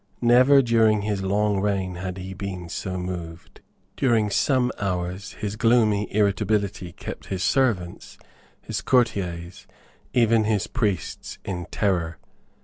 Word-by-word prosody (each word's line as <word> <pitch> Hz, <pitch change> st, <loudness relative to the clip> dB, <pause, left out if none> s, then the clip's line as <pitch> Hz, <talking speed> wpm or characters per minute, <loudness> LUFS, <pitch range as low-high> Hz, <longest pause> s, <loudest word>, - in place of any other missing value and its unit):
Never 130 Hz, +3 st, +6 dB
during 110 Hz, -3 st, +3 dB
his 105 Hz, -2 st, -1 dB
long 100 Hz, +1 st, +1 dB
reign 95 Hz, -3 st, -1 dB
had 90 Hz, +1 st, -5 dB
he 95 Hz, 0 st, -6 dB
been 95 Hz, -2 st, -6 dB
so 95 Hz, +1 st, -4 dB
moved. 90 Hz, -2 st, -7 dB, 0.3 s
During 115 Hz, -5 st, +2 dB
some 125 Hz, +3 st, +2 dB
hours 95 Hz, +1 st, -3 dB
his 105 Hz, 0 st, -4 dB
gloomy 110 Hz, -2 st, +2 dB
irritability 100 Hz, -2 st, 0 dB
kept -, -, -8 dB
his 95 Hz, -1 st, -3 dB
servants, 110 Hz, -11 st, 0 dB, 0.4 s
his 105 Hz, -3 st, -4 dB
courtiers, 95 Hz, -8 st, 0 dB, 0.4 s
even 115 Hz, -2 st, +3 dB
his 105 Hz, -2 st, +1 dB
priests, 105 Hz, -7 st, -3 dB
in 90 Hz, -3 st, -4 dB
terror. 85 Hz, -6 st, 0 dB
100 Hz, 125 wpm, -24 LUFS, 90-110 Hz, 0.4 s, Never